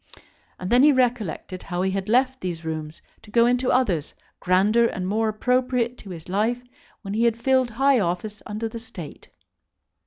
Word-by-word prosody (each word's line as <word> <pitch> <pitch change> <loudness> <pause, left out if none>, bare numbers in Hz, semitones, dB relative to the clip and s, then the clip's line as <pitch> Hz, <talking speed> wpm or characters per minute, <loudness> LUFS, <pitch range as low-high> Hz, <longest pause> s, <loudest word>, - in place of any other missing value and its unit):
And 185 +3 -5
then 245 +1 +6
he 295 +2 +7
recollected 235 - -1
how 180 -1 -3
he 190 - +1
had 195 +1 -3
left 260 +2 +2
these 170 -3 -4
rooms 155 -1 -5 0.2
to - - -16
go 235 +2 +4
into 250 +1 +1
others, 185 - +1 0.2
grander 205 +6 +3
and 185 -4 -4
more 220 +3 +1
appropriate 250 +2 0
to 200 - -11
his 165 -3 -9
life 220 +6 0 0.4
when 195 -1 -5
he 225 +3 +2
had 230 -1 +2
filled 260 +1 +2
high 265 +3 +3
office 200 +3 -3
under 215 +2 -3
the 230 +1 -7
State. 180 -9 -10
220 Hz, 180 wpm, -24 LUFS, 185-245 Hz, 0.4 s, he